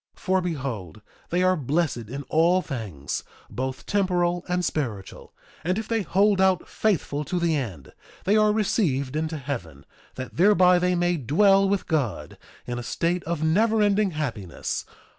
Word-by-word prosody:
For 190 Hz, 0 st, 0 dB
behold, 130 Hz, -, -4 dB, 0.3 s
they 180 Hz, +2 st, +1 dB
are 185 Hz, 0 st, +4 dB
blessed 140 Hz, -, -1 dB
in 140 Hz, +3 st, -5 dB
all 170 Hz, +6 st, +3 dB
things, 95 Hz, -, -5 dB, 0.3 s
both 130 Hz, +1 st, -4 dB
temporal 175 Hz, -3 st, +1 dB
and 180 Hz, 0 st, 0 dB
spiritual; 115 Hz, -13 st, -4 dB, 0.3 s
and 180 Hz, +4 st, 0 dB
if 220 Hz, -, -4 dB
they 225 Hz, -1 st, 0 dB
hold 195 Hz, +2 st, +2 dB
out 190 Hz, -2 st, +2 dB
faithful 160 Hz, -8 st, 0 dB
to 180 Hz, -, -1 dB
the 170 Hz, -2 st, +1 dB
end 95 Hz, -, -5 dB, 0.3 s
they 200 Hz, +3 st, +2 dB
are 215 Hz, -1 st, +4 dB
received 190 Hz, -, 0 dB
into 160 Hz, 0 st, -2 dB
heaven, 105 Hz, -, -6 dB, 0.3 s
that 130 Hz, -1 st, -7 dB
thereby 180 Hz, -1 st, +5 dB
they 180 Hz, 0 st, +1 dB
may 175 Hz, 0 st, +1 dB
dwell 195 Hz, -, +4 dB
with 200 Hz, -1 st, 0 dB
God 130 Hz, -, -2 dB, 0.3 s
in 120 Hz, 0 st, -4 dB
a -, -, -6 dB
state 170 Hz, +7 st, -1 dB
of 165 Hz, -1 st, -2 dB
never 215 Hz, +7 st, +3 dB
ending 205 Hz, 0 st, +3 dB
happiness. 125 Hz, -, -4 dB
170 Hz, 160 wpm, -25 LUFS, 130-190 Hz, 0.3 s, thereby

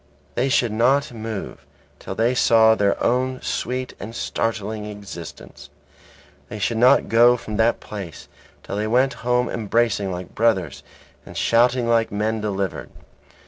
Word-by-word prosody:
They 130 Hz, +3 st, 0 dB
should 120 Hz, -3 st, +2 dB
not 125 Hz, +5 st, +2 dB
move 110 Hz, -2 st, -6 dB, 0.4 s
till -, -, -7 dB
they 115 Hz, +2 st, +2 dB
saw 115 Hz, -2 st, +5 dB
their 100 Hz, -2 st, +1 dB
own 130 Hz, +2 st, 0 dB
sweet 125 Hz, +1 st, -3 dB
and 110 Hz, +3 st, -8 dB
startling 110 Hz, -1 st, -3 dB
existence. 100 Hz, -6 st, -10 dB, 0.8 s
They 105 Hz, -, -6 dB
should 110 Hz, +3 st, -1 dB
not 125 Hz, +2 st, +5 dB
go 120 Hz, +2 st, +5 dB
from 110 Hz, -3 st, -6 dB
that 115 Hz, +1 st, +2 dB
place 100 Hz, -7 st, -8 dB, 0.4 s
till 100 Hz, -, -5 dB
they 105 Hz, +1 st, -1 dB
went 130 Hz, +4 st, +2 dB
home 125 Hz, +1 st, +1 dB
embracing 110 Hz, -3 st, 0 dB
like 90 Hz, 0 st, -7 dB
brothers 95 Hz, -10 st, 0 dB, 0.4 s
and -, -, -11 dB
shouting 120 Hz, +1 st, +2 dB
like 115 Hz, -1 st, +2 dB
men 110 Hz, +2 st, -1 dB
delivered. 100 Hz, -3 st, -3 dB
115 Hz, 145 wpm, -22 LUFS, 105-120 Hz, 0.8 s, saw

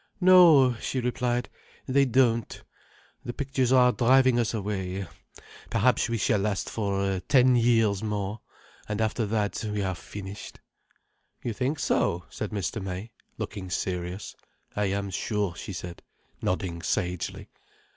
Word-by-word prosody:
"No," 175 Hz, -9 st, +7 dB
she 130 Hz, -, -3 dB
replied. 125 Hz, 0 st, -1 dB, 0.4 s
"They 140 Hz, +1 st, +3 dB
don't. 120 Hz, -3 st, +1 dB, 0.6 s
The 120 Hz, -, -5 dB
pictures 135 Hz, -2 st, -1 dB
are 125 Hz, -1 st, +6 dB
driving 130 Hz, 0 st, +4 dB
us 115 Hz, -, +1 dB
away. 95 Hz, -3 st, -3 dB, 0.6 s
Perhaps -, -, +2 dB
we 115 Hz, -, 0 dB
shall 105 Hz, -1 st, +2 dB
last 100 Hz, -1 st, -2 dB
for 100 Hz, -3 st, -1 dB
ten 130 Hz, -2 st, +5 dB
years 115 Hz, -4 st, +3 dB
more. 105 Hz, 0 st, -3 dB, 0.5 s
And 105 Hz, 0 st, -2 dB
after 110 Hz, 0 st, 0 dB
that, 105 Hz, -1 st, -1 dB
we 105 Hz, -1 st, -1 dB
are 95 Hz, -1 st, -1 dB
finished." 95 Hz, +3 st, -9 dB, 0.8 s
"You 120 Hz, -, -2 dB
think 130 Hz, +7 st, -1 dB
so," 90 Hz, -9 st, 0 dB
said 105 Hz, -, -4 dB
Mr. 105 Hz, +1 st, -3 dB
May, 95 Hz, +4 st, -5 dB, 0.3 s
looking 95 Hz, -3 st, -5 dB
serious. 90 Hz, +2 st, -3 dB, 0.4 s
"I 105 Hz, -, +1 dB
am 100 Hz, 0 st, -2 dB
sure," 100 Hz, 0 st, -1 dB
she -, -, -7 dB
said, 90 Hz, -2 st, -7 dB, 0.4 s
nodding 90 Hz, -2 st, -2 dB
sagely. 90 Hz, +1 st, -2 dB
105 Hz, 135 wpm, -27 LUFS, 95-125 Hz, 0.8 s, No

